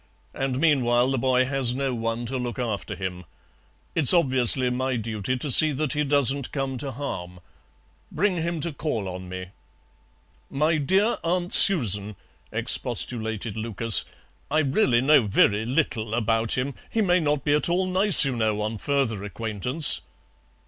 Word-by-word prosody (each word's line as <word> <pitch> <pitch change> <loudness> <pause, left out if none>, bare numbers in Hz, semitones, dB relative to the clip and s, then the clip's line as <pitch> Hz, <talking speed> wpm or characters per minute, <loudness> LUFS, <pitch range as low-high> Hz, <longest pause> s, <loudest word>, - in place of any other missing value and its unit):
And 135 -1 -4
meanwhile 130 -5 +1
the 135 - -2
boy 130 0 +1
has 130 -2 -2
no 135 -1 -3
one 115 0 -4
to 130 +2 -5
look 120 -1 -5
after 115 -5 -5
him. 90 -1 -7 0.7
It's 160 +1 +5
obviously 130 -4 +1
my 130 +1 -3
duty 110 +2 -4
to 140 +2 -4
see 155 +4 +7
that 150 +1 -3
he 150 0 -1
doesn't 140 -2 +1
come 135 -2 -4
to 135 +1 -5
harm. 90 -9 -7 0.7
Bring 195 -2 -1
him 165 -1 -4
to 170 0 -3
call 115 -10 -4
on 90 0 -8
me." 90 0 -8 1.0
"My 155 +3 -1
dear 195 - 0
Aunt 175 +1 -2
Susan," 105 - +6 0.4
expostulated 110 -2 -1
Lucas, 110 0 +2 0.5
"I 155 +2 +1
really 135 - +1
know 135 -4 +3
very 105 +2 +1
little 120 -6 -2
about 115 0 -1
him. 135 +2 -3 0.2
He 225 - -1
may 180 -2 +2
not 150 -4 -2
be 145 - 0
at 150 +3 +1
all 180 +2 0
nice, 185 -2 +6
you 135 -2 -3
know, 110 -2 -2
on 110 0 -5
further 130 -8 -2
acquaintance." 115 - -1
130 Hz, 155 wpm, -23 LUFS, 115-150 Hz, 1.0 s, see